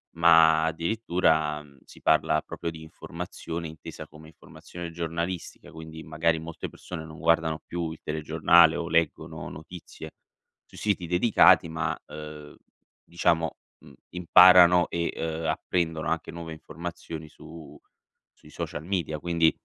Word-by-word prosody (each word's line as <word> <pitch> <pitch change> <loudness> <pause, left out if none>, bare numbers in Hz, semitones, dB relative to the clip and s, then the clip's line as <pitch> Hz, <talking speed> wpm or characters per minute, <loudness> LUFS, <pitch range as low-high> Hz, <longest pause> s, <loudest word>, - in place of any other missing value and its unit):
ma 80 -1 +5
addirittura 80 -4 0 0.2
si - - -16
parla 75 0 +3
proprio 85 - -5
di 80 -1 -10
informazione 85 +1 -7
intesa 80 0 -10
come 80 0 -15
informazione 85 +2 -10
giornalistica. 85 +1 -5
Quindi 80 0 -10
magari 80 +2 0
molte 80 0 -7
persone 85 -3 -8
non 80 0 -11
guardano 80 -2 +1
più 85 -1 -4
il 80 - -9
telegiornale 80 +2 +4
o 85 - -3
leggono 85 -2 -1
notizie 80 +3 -10 0.5
sui - - -17
siti 100 -5 -1
dedicati, 90 0 +5
ma, 80 0 -2
uhm, 75 -1 -10 0.5
diciamo, 85 -1 0 0.2
mhmm, - - -17 0.2
imparano 90 0 +6
e, 85 0 -2
uhm, 80 0 -4
apprendono 80 0 -1
anche 80 0 -2
nuove 85 -1 -7
informazioni 80 0 -8
su 80 -1 -13 0.6
sui - - -19
social 75 - -6
media. 85 -5 -2
Quindi, 85 -1 +2
80 Hz, 130 wpm, -26 LUFS, 80-85 Hz, 0.6 s, imparano